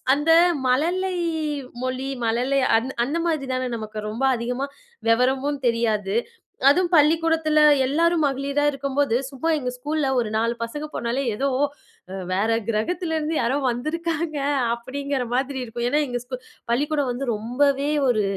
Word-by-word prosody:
அந்த 295 +3 -1 0.4
மழலை 355 +8 +1 0.7
மொழி 255 +1 -2 0.2
மழலை 250 +5 +1 0.2
அந் 255 +4 -2
அந்த 300 +6 -2
மாதிரிதானே 260 -5 -1
நமக்கு 215 -1 -6
ரொம்ப 230 +5 -4
அதிகமா 250 +4 -2 0.4
வெவரமும் 265 +4 +2
தெரியாது. 220 -4 0 0.5
அதுவும் 350 +4 +3
பள்ளிக்கூடத்துல 320 0 +3 0.3
எல்லாரும் 330 +3 +2
மகளிரா 280 +1 0
இருக்கும்போது 275 -2 0
சும்மா 285 +4 -3
எங்க 250 -2 -3
ஸ்கூல்ல 295 +1 -1
ஒரு 225 -3 -1
4 230 +2 +1
பசங்க 295 +6 -5
போனாலே, 235 +3 -1
ஏதோ, 275 +5 0 0.6
"அ - - -5 0.2
வேற 210 +4 +1 0.2
கிரகத்துல 320 - -1
இருந்து 310 +1 -2
யாரோ 255 +5 +1
வந்திருக்காங்க." 315 +4 -2 0.4
அப்படிங்கிற 265 +2 -3
மாதிரி 265 +1 -1
இருக்கும். 240 0 -4
ஏன்னா 295 +2 +2
எங்க 245 -1 -3
ஸ்கூ 255 0 -5 0.3
பள்ளிக்கூடம் 290 +1 +1
வந்து 255 +2 -4
ரொம்பவே 275 +6 +1 0.2
ஒரு 215 -4 +2
270 Hz, 135 wpm, -23 LUFS, 240-300 Hz, 0.7 s, அதுவும்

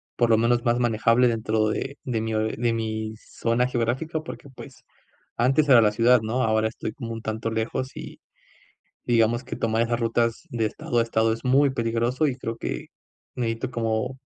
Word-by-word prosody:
por 120 - +2
lo 110 - +5
menos, 120 +1 +2
más 120 -1 +2
manejable 115 +1 +3
dentro 110 -2 +1
de 135 +6 -3
de 115 -4 -2
mi 110 0 -2
o 110 - +1
de 115 +2 0
mi 110 -1 -3
zona 115 +2 -1
geográfica 130 +7 -1
porque, 150 -3 -9
pues, 130 - -13 0.5
antes 135 +5 +3
era 125 -3 +8
la 105 -1 +4
ciudad 120 +2 +4
¿no? 115 +4 -1
Ahora 110 0 +2
estoy 110 -1 -6
como 115 0 -7
un 115 - -6
tanto 110 +1 -3
lejos 110 +4 -3
y, - - -8 0.9
digamos 120 0 +2
que, - - -6
tomar 115 0 +1
esas 120 0 0
rutas 115 0 0
de 115 -2 0
estado 120 +2 -3
a - - +4
estado 115 -1 +1
es 115 - -6
muy 135 +2 +4
peligroso, 120 +3 0
y 130 - -3
creo 115 -3 -5
que - - -4 0.5
necesito 115 +1 -2
como, 115 +2 -1
115 Hz, 190 wpm, -25 LUFS, 110-125 Hz, 0.9 s, era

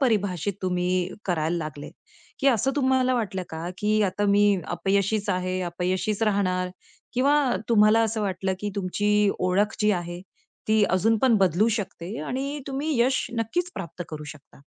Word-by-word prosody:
परिभाषित 205 - +1
तुम्ही 180 0 0 0.2
करायला 170 -2 0
लागले? 155 -3 -6 0.5
की 275 - +1
असं 260 +2 +2
तुम्हाला 260 -2 +2
वाटलं 200 -6 -2
का, 160 +2 -5
की 215 +1 +1
आता 205 +1 0
मी 205 +1 +4 0.2
अपयशीच 200 +2 0
आहे, 185 0 -1
अपयशीच 185 +5 -2
राहणार? 185 -4 +1 0.4
किंवा 275 +4 +3 0.3
तुम्हाला 215 0 +5
असं 220 0 -1
वाटलं 190 -1 -1
की 205 0 -2
तुमची 205 +2 +1
ओळख 190 +4 +1
जी 210 0 +4
आहे 175 +1 -7 0.5
ती 215 -1 +4
अजून 220 +5 +3
पण 250 -3 +5
बदलू 190 +3 +3
शकते 205 -3 -4
आणि 275 +3 -3
तुम्ही 280 0 -2
यश 260 +2 +2
नक्कीच 350 +11 -1
प्राप्त 175 -2 -6
करू 150 -1 -7
शकता. 145 -2 -13
205 Hz, 150 wpm, -25 LUFS, 180-225 Hz, 0.5 s, तुम्हाला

